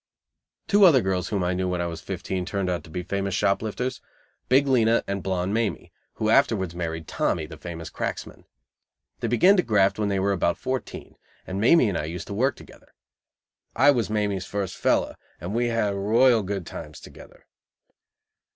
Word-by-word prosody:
Two 205 0 +4
other 145 -8 +6
girls 95 -2 -1
whom 100 -3 -1
I 90 +1 0
knew 90 0 -1
when 90 -1 -2
I 85 - -1
was 85 -1 -5
fifteen 95 0 -4
turned 95 0 -2
out 90 - -3
to - - -14
be 90 +3 -5
famous 100 0 -2
shop 100 - +1
lifters 125 +4 -4 0.5
Big 135 +3 +5
Lena 115 -3 +3
and 100 0 -3
Blonde 95 +1 -2
Mamie, 115 -2 -2 0.2
who 110 - -2
afterwards 110 -9 +2
married 80 -2 -4
Tommy, 80 - -1
the 75 - -10
famous 80 0 -8
cracksman. - - -5 0.7
They - - -2
began 150 - +5
to - - +5
graft 105 - +2
when 105 -1 0
they 100 -1 0
were 100 +1 +1
about 85 -3 0
fourteen, 130 0 -5 0.3
and 95 +2 -4
Mamie 125 +3 +5
and 95 -5 -1
I 75 - -3
used 85 +1 -6
to - - -4
work 130 +7 +1
together. - - -17 0.8
I 145 +4 +6
was 120 -7 -1
Mamie's 105 -3 -1
first 100 -2 -3
"fellow," - - +1 0.3
and 85 +5 -5
we 120 +1 +1
had 115 -3 0
royal 115 +4 +3
good 95 -2 -4
times 75 -3 -9
together. - - -15
100 Hz, 190 wpm, -25 LUFS, 90-115 Hz, 0.8 s, other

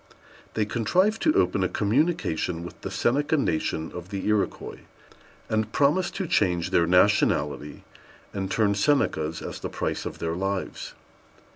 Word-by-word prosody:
They 110 - +1
contrived 180 - +1
to 310 - +3
open 100 - +2
a 90 - +1
communication 100 - 0
with 85 - -10
the - - -5
Seneca 145 +5 +1
Nation 80 - -1
of 90 0 -8
the 100 -1 -4
Iroquois, 105 -1 -1 0.7
and 110 0 -1
promised 155 +8 +2
to 195 - -2
change 90 - +1
their 85 - +3
nationality 75 -6 +2 0.5
and 95 -1 -3
turn 100 0 +2
Senecas 90 - +1
as - - -6
the - - -5
price - - -3
of - - -7
their 80 0 -2
lives. 95 +2 -3
100 Hz, 145 wpm, -26 LUFS, 85-140 Hz, 0.7 s, to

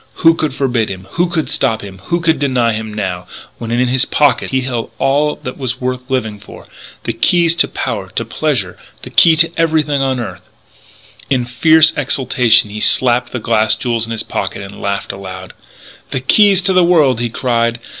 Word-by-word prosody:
Who 165 - +8
could 155 -2 -2
forbid 125 -6 0
him? 95 -1 -7
Who 175 +1 0 0.2
stop 115 -5 -1
him? 95 -2 -10
Who 170 0 -1
deny 135 -8 +1
him, 110 0 -5
now, 95 -4 -4 0.3
when, 115 - -6
in 120 +2 +1
his 130 +2 +2
pockets, 145 -4 +1
he 130 -1 +1
held 125 -3 -4
all 145 +2 +1
that 125 - -6
was 130 -4 -3
worth 125 0 -2
living 110 -6 -2
for 100 - -13 0.4
the - - -2
keys 170 -2 +2
to - - +3
power, - - -4
to - - -1
pleasure, 130 -13 -2 0.2
the - - -9
key 165 -1 +6
to 165 +1 +3
everything 155 -3 +1
on 130 -2 0
earth! 120 - -6 0.9
In 125 -3 +1
fierce 160 +6 +4
exultation 125 -5 +2
he 105 - -6
slapped 120 +1 +2
the - - -3
glass 110 -2 +1
jewels 115 -2 -2
in - - -7
his 115 - -2
pocket - - -4
and 100 +1 -10
laughed 100 0 -2
aloud. 95 -1 -9 0.6
"The 130 - -2
keys 195 +8 +4
to 190 +1 +1
the 185 -1 +4
world!" 150 -9 +3
he 120 0 -1
cried. 115 -1 -1
125 Hz, 185 wpm, -15 LUFS, 115-150 Hz, 0.9 s, Who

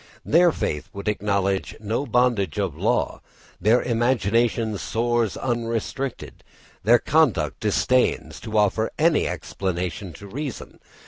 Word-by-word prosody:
Their 170 +2 +5
faith 75 - -3
would 100 +2 -7
acknowledge 100 -2 0
no 110 +6 -2
bondage 120 - +1
of - - -1
law, - - 0 0.4
their 110 +6 +4
imagination 115 -2 +1
soars 120 -1 0
unrestricted, 120 +2 -3 0.4
their 115 +5 +6
conduct 120 - +1
disdains 125 0 +1
to 110 -2 -4
offer 105 +2 +2
any 160 0 +3
explanation 90 +1 -4
to 100 - -11
reason. 135 +6 -6
115 Hz, 115 wpm, -23 LUFS, 100-125 Hz, 0.4 s, their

